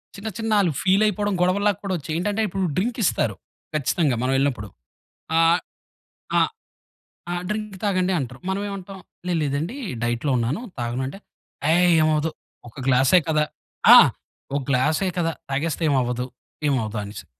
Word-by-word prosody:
చిన్న 200 Hz, +2 st, -7 dB
చిన్న 225 Hz, -1 st, -2 dB
ఆళ్ళు 185 Hz, -5 st, +2 dB
ఫీల్ 190 Hz, +2 st, +3 dB
అయిపోవడం 205 Hz, 0 st, 0 dB
గొడవల్లా 200 Hz, +3 st, +3 dB
కూడా 195 Hz, -1 st, -2 dB
వచ్చాయి. 155 Hz, 0 st, -6 dB
ఏంటంటే 205 Hz, +5 st, -1 dB
ఇప్పుడు 195 Hz, 0 st, -2 dB
డ్రింక్ 230 Hz, +6 st, 0 dB
ఇస్తారు 110 Hz, -, +1 dB, 0.4 s
ఖచ్చితంగా 145 Hz, 0 st, +1 dB
మనం 130 Hz, +1 st, +1 dB
ఎళ్ళినప్పుడు. 135 Hz, -6 st, 0 dB, 0.7 s
ఆహ్, 165 Hz, +1 st, +5 dB, 0.8 s
ఆహ్, -, -, +4 dB, 0.8 s
"ఆ! -, -, -1 dB, 0.2 s
డ్రింక్ 210 Hz, -1 st, -3 dB
తాగండి" 190 Hz, -2 st, +1 dB
అంటారు. 130 Hz, -1 st, -6 dB
మనం 190 Hz, +1 st, -1 dB
ఏమంటాం, 195 Hz, -1 st, -7 dB, 0.3 s
"లేదు 175 Hz, -2 st, +1 dB
లేదండి 150 Hz, -, -2 dB, 0.3 s
డైట్‌లో 120 Hz, +4 st, 0 dB
ఉన్నాను. 125 Hz, -, -1 dB, 0.2 s
తాగను." 120 Hz, +2 st, -2 dB
అంటే 170 Hz, +9 st, -8 dB, 0.5 s
"అయ్ 165 Hz, +2 st, +5 dB, 0.2 s
ఏమవ్వదు 155 Hz, 0 st, +2 dB, 0.4 s
ఒక -, -, -23 dB
గ్లాసే 135 Hz, +7 st, +5 dB
కదా. 155 Hz, -1 st, +3 dB, 0.5 s
ఆ! -, -, +12 dB, 0.6 s
ఒక 145 Hz, -, 0 dB
గ్లాసే 150 Hz, +8 st, +2 dB
కదా 165 Hz, -1 st, 0 dB, 0.2 s
తాగేస్తే 155 Hz, +4 st, -1 dB
ఏమవ్వదు 125 Hz, -3 st, 0 dB, 0.4 s
ఏమవ్వదు" 110 Hz, -5 st, -1 dB
అనేసి. 100 Hz, +1 st, -8 dB
160 Hz, 145 wpm, -23 LUFS, 130-195 Hz, 0.8 s, ఆ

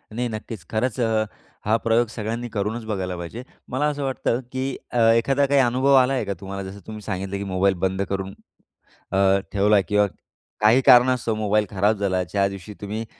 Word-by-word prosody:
नाही, 125 Hz, 0 st, -1 dB
नक्कीच. 110 Hz, -3 st, -7 dB
खरंच 115 Hz, +2 st, -1 dB
अ, 110 Hz, -1 st, +2 dB, 0.4 s
हा 110 Hz, -, +3 dB
प्रयोग 115 Hz, +1 st, +2 dB
सगळ्यांनी 115 Hz, +2 st, -4 dB
करूनच 110 Hz, +2 st, -3 dB
बघायला 95 Hz, -4 st, -3 dB
पाहिजे. 85 Hz, +9 st, -7 dB, 0.3 s
मला 130 Hz, +3 st, 0 dB
असं 145 Hz, -1 st, -2 dB
वाटतं, 130 Hz, -2 st, -1 dB
की 130 Hz, +1 st, -2 dB, 0.2 s
अ, -, -, -2 dB, 0.2 s
एखादा 135 Hz, +5 st, +2 dB
काही 140 Hz, 0 st, +3 dB
अनुभव 130 Hz, +3 st, +2 dB
आला 130 Hz, +1 st, +4 dB
आहे 130 Hz, -5 st, -1 dB
का 100 Hz, -, -2 dB
तुम्हाला? 100 Hz, 0 st, -5 dB
जसं 100 Hz, +1 st, -10 dB
तुम्ही 110 Hz, -1 st, -7 dB
सांगितलं, 95 Hz, -1 st, -4 dB
की 100 Hz, -, -4 dB
मोबाईल 95 Hz, 0 st, +1 dB
बंद 95 Hz, +1 st, -1 dB
करून 95 Hz, 0 st, -3 dB, 0.8 s
अ, 95 Hz, 0 st, +4 dB
ठेवला 105 Hz, +1 st, +4 dB
किंवा 105 Hz, 0 st, +4 dB, 0.6 s
काही 115 Hz, +5 st, +5 dB
कारणास्तव 125 Hz, -2 st, +5 dB
मोबाईल 105 Hz, 0 st, +1 dB
खराब 105 Hz, +2 st, +1 dB
झाला, 95 Hz, -2 st, 0 dB
ज्या 100 Hz, +3 st, 0 dB
दिवशी 100 Hz, +1 st, -9 dB
तुम्ही 110 Hz, +3 st, -4 dB
110 Hz, 180 wpm, -23 LUFS, 100-120 Hz, 0.8 s, काही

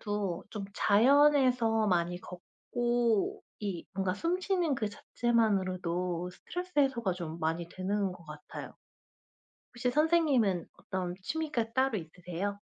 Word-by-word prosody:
아무래도 200 Hz, -4 st, -2 dB
좀 205 Hz, -3 st, -5 dB
자연에서 250 Hz, -1 st, +4 dB
많이 175 Hz, -1 st, +1 dB
걷고 240 Hz, +4 st, -1 dB, 0.2 s
이 195 Hz, -5 st, -4 dB
뭔가 190 Hz, -1 st, 0 dB
숨 340 Hz, -, -1 dB
쉬는 360 Hz, -7 st, +1 dB
그 215 Hz, -4 st, -1 dB
자체만으로도 185 Hz, -6 st, 0 dB
스트레스 360 Hz, -, -7 dB
해소가 235 Hz, -9 st, +2 dB
좀 170 Hz, -2 st, -6 dB
많이 165 Hz, +2 st, -1 dB
되는 195 Hz, +1 st, -1 dB
것 175 Hz, -2 st, -13 dB
같아요. 150 Hz, 0 st, -9 dB, 1.0 s
혹시 245 Hz, 0 st, -1 dB
선생님은 285 Hz, -, +3 dB
어떤 180 Hz, -1 st, -3 dB
취미가 295 Hz, -4 st, -2 dB
따로 260 Hz, -3 st, +2 dB
있으세요? 180 Hz, +4 st, -5 dB
205 Hz, 280 characters per minute, -31 LUFS, 180-250 Hz, 1.0 s, 자연에서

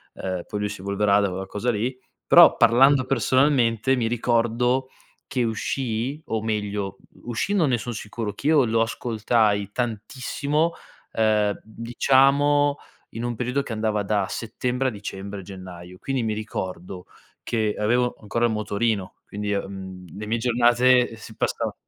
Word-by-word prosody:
ehm, 95 Hz, -2 st, -3 dB
poi 105 Hz, -, -5 dB
lui 105 Hz, -, -1 dB
si 105 Hz, -2 st, -7 dB
evolverà 100 Hz, +1 st, +2 dB
da 100 Hz, -, +1 dB
quella 95 Hz, +1 st, -4 dB
cosa 110 Hz, +5 st, -2 dB
lì. 120 Hz, +4 st, -2 dB, 0.3 s
Però, -, -, +8 dB
parlando 130 Hz, +3 st, +5 dB
personalmente, 130 Hz, -1 st, +2 dB
mi 115 Hz, -3 st, 0 dB
ricordo 120 Hz, +2 st, +1 dB, 0.4 s
che 125 Hz, -3 st, -1 dB
uscì 120 Hz, +4 st, -2 dB
o 110 Hz, -1 st, -2 dB
meglio, 105 Hz, -3 st, -2 dB, 0.3 s
uscì 120 Hz, -, -2 dB
non 165 Hz, -8 st, +3 dB
ne 120 Hz, -, +2 dB
son 120 Hz, +2 st, -5 dB
sicuro, 105 Hz, -1 st, -5 dB
che 140 Hz, -, -5 dB
io 150 Hz, -5 st, +5 dB
lo 115 Hz, 0 st, +1 dB
ascoltai 110 Hz, -3 st, 0 dB
tantissimo, 130 Hz, +7 st, -2 dB, 0.4 s
ehm, 105 Hz, -2 st, +1 dB
diciamo 140 Hz, +5 st, +2 dB, 0.3 s
in 115 Hz, +2 st, -6 dB
un 120 Hz, -1 st, -2 dB
periodo 125 Hz, +3 st, -1 dB
che 125 Hz, -, -8 dB
andava 110 Hz, -1 st, -1 dB
da 100 Hz, -1 st, 0 dB
settembre 125 Hz, +3 st, -2 dB
a -, -, -7 dB
dicembre-gennaio. 95 Hz, -3 st, -8 dB
Quindi 135 Hz, -2 st, -2 dB
mi 110 Hz, -1 st, -1 dB
ricordo 95 Hz, -4 st, -6 dB, 0.4 s
che 110 Hz, -2 st, 0 dB
avevo 120 Hz, +3 st, +2 dB
ancora 110 Hz, +3 st, -2 dB
il 115 Hz, -, +1 dB
motorino, 105 Hz, -2 st, -1 dB
quindi, 105 Hz, 0 st, -3 dB
uhm, 95 Hz, -2 st, -5 dB
le 105 Hz, -, -5 dB
mie 115 Hz, +2 st, -1 dB
giornate, 120 Hz, +1 st, +3 dB
si 110 Hz, 0 st, -11 dB
passava -, -, -1 dB
115 Hz, 150 wpm, -24 LUFS, 105-125 Hz, 0.4 s, Però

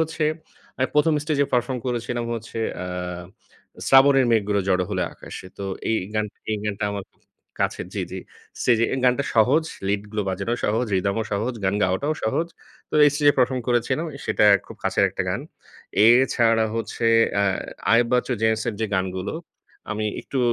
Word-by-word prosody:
হচ্ছে 160 Hz, -1 st, -1 dB, 0.5 s
আমি 130 Hz, -, +1 dB
১ম 150 Hz, +1 st, +4 dB
স্টেজে 150 Hz, -2 st, +1 dB
পারফর্ম 125 Hz, +1 st, +1 dB
করেছিলাম 120 Hz, -1 st, -2 dB
হচ্ছে, 115 Hz, 0 st, -7 dB, 0.2 s
অ্যা 90 Hz, -, -5 dB, 1.0 s
"শ্রাবণের 135 Hz, 0 st, +6 dB
মেঘগুলো 105 Hz, -3 st, +2 dB
জড়ো 90 Hz, -1 st, +2 dB
হল -, -, -2 dB, 0.2 s
আকাশে।" -, -, -9 dB
তো 100 Hz, -, -4 dB, 0.3 s
এই 110 Hz, -, +2 dB, 0.2 s
গান, 105 Hz, 0 st, +1 dB, 0.3 s
এই 110 Hz, -, +1 dB
গানটা 105 Hz, 0 st, -2 dB
আমার 100 Hz, -1 st, -5 dB
খুব -, -, -38 dB, 0.4 s
কাছের -, -, -1 dB
জি, -, -, -1 dB
জি। -, -, -5 dB, 0.4 s
স্টেজে, 115 Hz, -2 st, +3 dB
এই -, -, -2 dB
গানটা 125 Hz, +2 st, +3 dB
সহজ, 130 Hz, +8 st, +4 dB, 0.2 s
লিড 100 Hz, 0 st, 0 dB
গুলো 105 Hz, -1 st, -1 dB
বাজানোও 100 Hz, +6 st, -2 dB
সহজ, 115 Hz, +4 st, +1 dB
rhythm 100 Hz, +1 st, +1 dB
ও -, -, 0 dB
সহজ, 110 Hz, +5 st, -1 dB
গান 95 Hz, +1 st, +1 dB
গাওয়াটাও 95 Hz, +12 st, +1 dB
সহজ। 160 Hz, +9 st, 0 dB, 0.4 s
তো -, -, -7 dB, 0.2 s
স্টেজে 145 Hz, -1 st, +4 dB
পারফর্ম 130 Hz, 0 st, +2 dB
করেছিলাম, 120 Hz, +7 st, +1 dB, 0.2 s
সেটা -, -, +2 dB, 0.2 s
খুব -, -, -11 dB
কাছের -, -, +2 dB
একটা -, -, -2 dB
গান। -, -, -1 dB, 0.7 s
এছাড়া 115 Hz, -2 st, +4 dB
হচ্ছে 115 Hz, 0 st, -2 dB, 0.3 s
অ্যা 100 Hz, -, +2 dB, 0.5 s
আয়েব 115 Hz, +1 st, +5 dB
বাচ্চু, 125 Hz, +1 st, +1 dB
জেমস 110 Hz, 0 st, +2 dB
এর 110 Hz, -, -2 dB
যে 110 Hz, -, +1 dB
গানগুলো, 95 Hz, +1 st, -2 dB, 0.6 s
আমি 110 Hz, 0 st, -2 dB, 0.2 s
একটু 135 Hz, -, -5 dB
115 Hz, 165 wpm, -23 LUFS, 105-130 Hz, 1.0 s, শ্রাবণের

